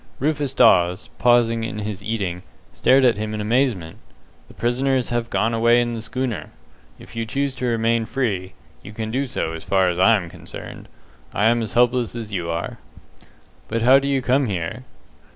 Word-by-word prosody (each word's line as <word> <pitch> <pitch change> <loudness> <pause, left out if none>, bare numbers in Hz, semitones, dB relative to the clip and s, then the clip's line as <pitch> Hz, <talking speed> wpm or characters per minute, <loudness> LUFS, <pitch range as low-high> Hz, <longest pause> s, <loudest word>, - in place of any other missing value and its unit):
Rufus 145 -1 -1
Dawes, 90 -2 +4
pausing 120 -2 +3
in 115 -2 -4
his 105 -2 -5
eating, 100 -5 -3 0.3
stared 130 0 +4
at 115 -4 +3
him 110 0 -3
in - - -4
amazement. 105 -6 0 0.5
"The - - -17
prisoners 130 +2 0
have 120 -1 -2
gone 115 +1 0
away 115 +1 +4
in 120 0 0
the 115 - -4
schooner. 125 -1 -3 0.5
If - - -14
you 115 - -2
choose 140 +3 -1
to 125 - 0
remain 115 0 +1
free, 100 -8 -2 0.3
you 105 - -11
can 110 0 -4
do 135 +3 -1
so 80 - -3
as 80 - -7
far 95 -2 +2
as 90 0 -3
I 115 +5 +6
am 90 -5 -2
concerned. - - -10 0.5
I 105 - +2
am 120 +1 +3
as 110 - -5
helpless 120 -1 +2
as 110 -3 -6
you 85 -3 -2
are." 85 +1 -4 0.9
"But 115 +1 -2
how 130 +3 +7
do 140 - -3
you 135 -2 0
come 130 +2 +2
here?" 100 +6 -4
115 Hz, 190 wpm, -22 LUFS, 105-125 Hz, 0.9 s, how